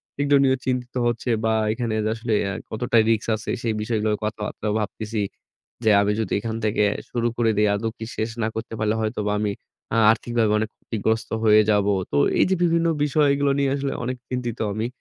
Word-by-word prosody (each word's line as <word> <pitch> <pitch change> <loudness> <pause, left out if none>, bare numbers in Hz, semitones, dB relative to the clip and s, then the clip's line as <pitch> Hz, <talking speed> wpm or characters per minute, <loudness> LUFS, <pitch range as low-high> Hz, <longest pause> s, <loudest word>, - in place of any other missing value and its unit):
সেগুলো 145 0 +3
নিয়ে 130 -1 +3
চিন্তিত 125 -1 -2
হচ্ছে 120 +1 -2 0.2
বা 110 - +2 0.2
এখানে 115 -1 -2 0.2
আসলে 115 0 -3 0.2
আ - - -3 0.2
কতটা 120 +2 0
risk 115 -2 +2
আছে 110 - -7
সেই 115 -2 0
বিষয়গুলো 110 -1 0 0.2
কথাবার্তাও 105 0 -3
ভাবতেছি। 105 +1 -3 0.6
যে 110 - +5
আমি 100 - +1
যদি 105 - -3
এখান 110 +1 -4
থেকে 105 0 +2 0.3
শুরু 120 -1 0
করে 115 -1 +2
দেই 105 0 +4
আদৌ 110 +2 -2
কি 110 - -6
শেষ 110 +1 -1
না - - +1
করতে 110 0 -5
পারলে 110 0 +1
হয়তোবা 105 -1 -1
আমি 105 -1 0 0.4
আ - - +3
আর্থিকভাবে 115 -1 0
অনেক 110 - -2
ক্ষতিগ্রস্ত 110 +1 -2 0.2
হয়ে 110 0 +7
যাব। 105 -1 +3 0.3
তো 70 - +1 0.2
এই - - +5
যে 190 - +3
বিভিন্ন 170 0 +2 0.2
বিষয়গুলো 145 -1 +2
নিয়ে 135 -1 +2
আসলে 140 -1 -2
অনেক 125 +1 -3
চিন্তিত 120 -2 -3 0.2
আমি। 110 +2 -2
115 Hz, 190 wpm, -23 LUFS, 110-125 Hz, 0.6 s, হয়ে